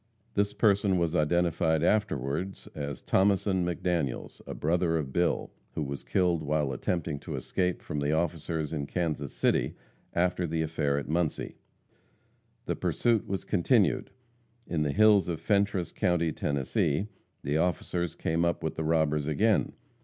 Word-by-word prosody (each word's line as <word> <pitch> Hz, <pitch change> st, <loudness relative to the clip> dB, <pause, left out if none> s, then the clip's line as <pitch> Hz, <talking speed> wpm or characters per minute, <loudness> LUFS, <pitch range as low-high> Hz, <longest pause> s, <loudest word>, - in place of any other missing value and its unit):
This 100 Hz, 0 st, +1 dB
person 100 Hz, -2 st, +3 dB
was 85 Hz, -1 st, 0 dB
identified 80 Hz, 0 st, +2 dB
afterward 95 Hz, -3 st, 0 dB, 0.2 s
as 70 Hz, -2 st, -5 dB
Thomason 95 Hz, -1 st, +2 dB
McDaniels, 85 Hz, -5 st, -2 dB
a -, -, -5 dB
brother 85 Hz, +1 st, +1 dB
of 70 Hz, -4 st, -4 dB
Bill, 85 Hz, 0 st, +1 dB, 0.2 s
who 75 Hz, -, -1 dB
was 70 Hz, 0 st, -5 dB
killed 90 Hz, -3 st, +1 dB
while 75 Hz, -2 st, 0 dB
attempting 80 Hz, +2 st, -2 dB
to -, -, -6 dB
escape 90 Hz, -1 st, -1 dB
from 75 Hz, -, -3 dB
the 70 Hz, +1 st, 0 dB
officers 80 Hz, -1 st, -1 dB
in 70 Hz, -3 st, -2 dB
Kansas 75 Hz, -6 st, -2 dB
City, -, -, +1 dB, 0.4 s
after 90 Hz, 0 st, +1 dB
the 80 Hz, 0 st, -1 dB
affair 75 Hz, -3 st, 0 dB
at 70 Hz, -, -3 dB
Muncie. 80 Hz, 0 st, -1 dB, 1.1 s
The -, -, -1 dB
pursuit 115 Hz, -3 st, +1 dB
was 95 Hz, -1 st, -2 dB
continued. 100 Hz, -, +2 dB, 0.6 s
In 85 Hz, -6 st, -1 dB
the 75 Hz, -1 st, +1 dB
hills 105 Hz, +2 st, +5 dB
of 85 Hz, -3 st, -2 dB
Fentress 100 Hz, -4 st, +1 dB
county, 85 Hz, -2 st, +1 dB
Tennessee, 70 Hz, +4 st, 0 dB, 0.4 s
the 70 Hz, +2 st, 0 dB
officers 85 Hz, 0 st, -1 dB
came 80 Hz, +1 st, 0 dB
up 85 Hz, 0 st, 0 dB
with 80 Hz, -, -3 dB
the 80 Hz, -, -1 dB
robbers 75 Hz, -2 st, +1 dB
again. 105 Hz, +8 st, +2 dB
85 Hz, 145 wpm, -29 LUFS, 75-90 Hz, 1.1 s, hills